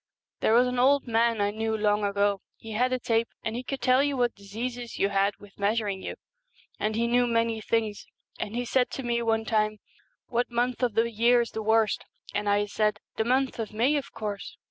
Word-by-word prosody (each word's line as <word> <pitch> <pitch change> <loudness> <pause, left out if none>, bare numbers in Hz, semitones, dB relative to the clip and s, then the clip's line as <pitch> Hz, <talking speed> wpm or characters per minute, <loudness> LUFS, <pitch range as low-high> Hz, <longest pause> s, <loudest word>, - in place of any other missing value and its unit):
There 220 - +3
was 245 +1 +6
an 250 0 -1
old 275 +2 +4
man 230 -1 +2
I 205 0 +2
knew 220 +1 -1
long 210 0 +2
ago, 200 0 +1 0.2
he 225 - -10
had 250 +4 +1
a 255 - +2
tape, 230 -2 +1 0.2
and 225 - -2
he 245 - -2
could 265 +1 -5
tell 255 +2 +4
what 245 -1 +2
diseases 235 +4 -6
you 200 - +2
had 200 0 +1
with 205 -1 -17
measuring 205 -1 0
you; - - -5 0.6
and 215 0 0
he 230 +1 +1
knew 245 +1 +3
many 230 -1 +1
things. 215 -1 -1 0.3
And 215 - -4
he 245 0 -1
said 250 +1 +2
to 270 - -4
me 235 -1 0
one 225 -1 +1
time, 215 -1 +1 0.3
" - - -44
What 245 0 -1
month 245 +1 -1
of 240 -4 +1
the 230 +1 +2
year 235 +2 +4
is 235 - -4
the 220 - -4
worst? 220 0 +2 0.2
" - - -17
and 205 0 -1
I 205 0 +3
said, 210 0 0
" - - -67
The 220 - +1
month 260 +1 +1
of 220 -1 -4
May, 245 +7 +2
of 280 -1 -3
course." 205 -2 -5
225 Hz, 230 wpm, -27 LUFS, 210-245 Hz, 0.6 s, was